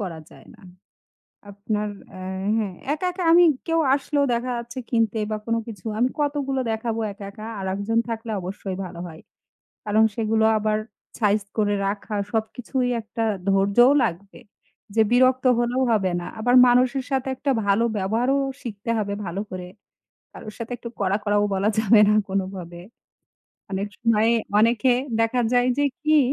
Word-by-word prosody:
করা 180 -5 -5
যায় - - -16
না। - - -19 0.9
আপনার 210 +1 -3 0.3
এ্যা 190 +1 -5
হ্যাঁ, 205 -4 -2 0.2
একা, 310 +4 -2
একা, 365 +1 -5
আমি 350 +1 +7 0.2
কেউ 330 -1 +1 0.2
আসলেও 285 +1 0
দেখা 240 +2 -2
যাচ্ছে 235 +2 -7
কিনতে 225 -2 +1
বা 215 - -1
কোন 230 0 +1
কিছু, 215 -6 -10
আমি 245 +2 +3
কতগুলো 280 -2 -1
দেখাবো 225 0 -2
একা, 200 0 -10
একা? 215 +2 -10 0.2
আরেকজন 200 +4 -1
থাকলে 225 0 -4
অবশ্যই 190 +1 -5
ভালো 180 -2 -9
হয়। 160 -2 -11 0.6
কারণ 215 +1 +3
সেগুলো 220 -1 +1
আবার 215 0 0 0.4
সাইজ 210 -1 +2 0.2
করে 205 -1 +2
রাখা, 205 +2 -3 0.2
সবকিছুই 245 +3 -2
একটা 225 +1 -5 0.3
ধৈর্যও 200 +7 +5
লাগবে 195 +1 -5 0.6
যে 220 - +6
বিরক্ত 255 +1 +4
হলেও 240 +2 +1
হবে 195 -4 +2
না। 175 - -7
আবার 245 +3 +2
মানুষের 255 +2 +3
সাথে 265 -1 -1
একটা 280 +2 -1 0.2
ভালো 200 +3 +3
ব্যবহারও 225 +7 +1 0.3
শিখতে 220 -1 -6
হবে 205 -1 -2
ভালো 175 +3 -3
করে। 180 -1 -6 0.6
কারোর 215 -1 -10
সাথে 230 +1 -6
একটু 235 - -7
কড়া, 195 0 +1
কড়াও, 205 -1 +2
বলা 195 +2 +1
যাবে 220 0 +5
না 210 - +4
কোনভাবে। 185 -3 -4 0.9
অনেক 195 +1 -1
সময়ে 230 0 +3 0.3
অনেকে 235 +3 +3 0.3
দেখা 225 +2 +1
যায় 245 0 +3
যে 290 - +3 0.2
কি, 310 0 +4
220 Hz, 155 wpm, -23 LUFS, 200-245 Hz, 0.9 s, আমি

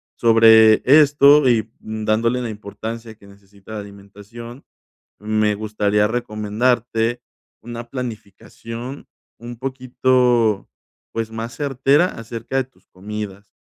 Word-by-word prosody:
Sobre 110 -1 +6
esto, 145 0 +6
y 115 -3 +3 0.2
mm, 110 0 -6
dándole 115 +3 +1
la 120 -2 -4
importancia 110 +2 -8
que 100 - -20
necesita 100 +1 -17
la 110 - -4
alimentación, 105 +5 -12 0.6
me 105 0 0
gustaría 105 0 0
recomendarte 115 +1 -1 0.4
una 120 0 -8
planificación 115 +1 -8 0.3
un 120 +1 -8
poquito, 125 -4 +1 0.4
pues, 115 -1 -3
más 115 +1 -6
certera 140 +2 +2
acerca 115 -1 -6
de 135 - +2
tus 130 - -31
comidas, 100 +1 -8
115 Hz, 110 wpm, -20 LUFS, 105-125 Hz, 0.6 s, Sobre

